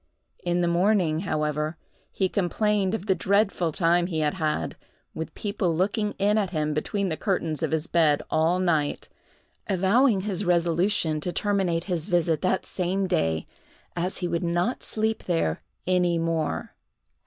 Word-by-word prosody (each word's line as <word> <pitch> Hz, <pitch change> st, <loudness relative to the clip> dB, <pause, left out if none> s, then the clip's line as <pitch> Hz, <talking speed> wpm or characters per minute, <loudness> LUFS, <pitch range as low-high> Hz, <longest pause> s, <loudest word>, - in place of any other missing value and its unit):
In 175 Hz, 0 st, +1 dB
the 175 Hz, -, +2 dB
morning, 175 Hz, -2 st, +2 dB
however, 150 Hz, +1 st, -1 dB, 0.3 s
he 190 Hz, -, 0 dB
complained 200 Hz, +2 st, 0 dB
of 210 Hz, -, -5 dB
the 195 Hz, -, +3 dB
dreadful 195 Hz, -3 st, +1 dB
time 175 Hz, +2 st, +2 dB
he 160 Hz, -4 st, -2 dB
had 150 Hz, -1 st, +1 dB
had, 155 Hz, -, -2 dB, 0.4 s
with 160 Hz, -, -5 dB
people 200 Hz, -5 st, -1 dB
looking 205 Hz, +4 st, 0 dB
in 205 Hz, +2 st, +2 dB
at 200 Hz, -3 st, 0 dB
him 155 Hz, -3 st, -1 dB
between 195 Hz, +6 st, -1 dB
the 160 Hz, -, -1 dB
curtains 170 Hz, -7 st, -1 dB
of -, -, -1 dB
his 160 Hz, 0 st, 0 dB
bed 155 Hz, -4 st, +2 dB
all 165 Hz, +3 st, +2 dB
night—avowing 190 Hz, -, 0 dB
his 200 Hz, -1 st, -2 dB
resolution 170 Hz, -1 st, +2 dB
to 175 Hz, +4 st, -3 dB
terminate 185 Hz, -4 st, 0 dB
his 175 Hz, -4 st, -2 dB
visit 170 Hz, -2 st, +1 dB
that 185 Hz, 0 st, 0 dB
same 190 Hz, +1 st, -1 dB
day, 80 Hz, -, 0 dB, 0.5 s
as 175 Hz, +2 st, -2 dB
he 180 Hz, -, -1 dB
would 170 Hz, -1 st, -1 dB
not 175 Hz, +8 st, 0 dB
sleep 220 Hz, 0 st, -1 dB
there 165 Hz, -, 0 dB, 0.2 s
any 180 Hz, -2 st, +2 dB
more. 165 Hz, -2 st, -2 dB
175 Hz, 155 wpm, -26 LUFS, 160-195 Hz, 0.5 s, the